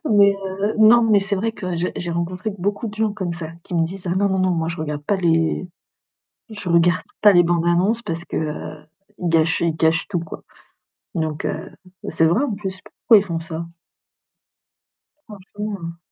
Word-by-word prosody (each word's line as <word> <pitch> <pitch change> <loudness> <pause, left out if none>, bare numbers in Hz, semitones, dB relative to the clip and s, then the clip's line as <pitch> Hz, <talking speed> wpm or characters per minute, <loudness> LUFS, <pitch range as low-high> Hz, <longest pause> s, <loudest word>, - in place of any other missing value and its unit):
Mais 200 -1 +6
heu, 195 +3 -2
non, 225 +2 +7
mais 220 -2 +4
c'est 195 0 -1
vrai 225 +3 -1
que 180 -5 -4
j'ai 175 +2 -1
j'ai 175 -1 -3
rencontré 180 +5 -3
beaucoup 205 +5 -2
de 210 - -6
gens 215 -1 0
comme 185 -4 -3
ça 165 -2 -6
qui 180 - -8
me 165 - +3
disent: 185 +2 -7
«Ah, 175 - 0
non 200 +1 +2
non 190 - 0
non, 185 0 +2
moi 165 -1 -1
je 165 - -4
regarde 150 -2 -4
pas 200 +6 0
les 165 0 +1 0.8
je 205 -4 -6
regarde 170 +1 +3 0.2
pas 210 -1 +8
les 175 -1 +6
bandes-annonces 175 +6 +2
parce 170 -5 -4
qu'ils 155 -1 -5 0.3
gâchent 165 -2 +2
ils 170 -2 +1
gâchent 160 0 +2
tout 180 -4 -1
quoi» 165 - -9 0.7
donc 155 -2 -2
heu, 160 - -3 0.4
c'est 160 0 +2
vrai, 195 - +2
en 245 - -2
plus 190 -2 -6
pourquoi 215 +2 +3
ils 200 - -1
font 170 -3 -3
ça? 165 0 -6 1.6
Franchement. 200 -4 -7
180 Hz, 185 wpm, -21 LUFS, 165-205 Hz, 1.6 s, pas